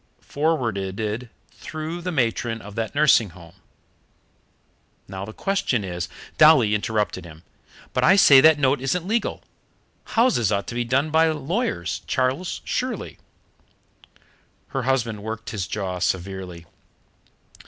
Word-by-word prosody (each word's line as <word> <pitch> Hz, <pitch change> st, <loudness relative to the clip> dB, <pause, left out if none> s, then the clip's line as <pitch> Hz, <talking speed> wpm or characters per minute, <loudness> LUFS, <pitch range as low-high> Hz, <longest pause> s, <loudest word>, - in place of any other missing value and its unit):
Forwarded 115 Hz, -6 st, -2 dB, 0.2 s
through 155 Hz, +2 st, -6 dB
the 180 Hz, +1 st, -3 dB
matron 115 Hz, -5 st, -1 dB
of 105 Hz, -1 st, -11 dB
that 115 Hz, +4 st, -4 dB
nursing 145 Hz, -8 st, +4 dB
home. 85 Hz, -1 st, -14 dB, 1.5 s
Now, 95 Hz, 0 st, -6 dB
the 110 Hz, -, -8 dB
question 130 Hz, -, -1 dB
is 90 Hz, -2 st, -4 dB
" -, -, -19 dB
Dolly 150 Hz, -9 st, +6 dB
interrupted 105 Hz, -2 st, -1 dB
him. 80 Hz, -1 st, -13 dB, 0.5 s
"But -, -, 0 dB
I 190 Hz, -, +6 dB
say 140 Hz, -9 st, +8 dB
that 155 Hz, 0 st, +6 dB
note 135 Hz, -1 st, +2 dB
isn't 165 Hz, +6 st, -1 dB
legal. 225 Hz, +3 st, -1 dB, 0.7 s
Houses 225 Hz, -, +3 dB
ought 100 Hz, -1 st, 0 dB
to -, -, -6 dB
be 120 Hz, 0 st, -1 dB
done 135 Hz, +6 st, 0 dB
by 160 Hz, +1 st, +4 dB
a 160 Hz, -1 st, +1 dB
lawyer, 160 Hz, -, -2 dB, 0.2 s
Charles, 130 Hz, +8 st, -1 dB
surely." 250 Hz, -5 st, -3 dB, 1.5 s
Her 135 Hz, -, -2 dB
husband 120 Hz, -5 st, -1 dB
worked 110 Hz, +2 st, -6 dB
his 100 Hz, -5 st, -3 dB
jaw 95 Hz, -4 st, -4 dB
severely. 90 Hz, -1 st, -3 dB
120 Hz, 130 wpm, -23 LUFS, 100-155 Hz, 1.5 s, say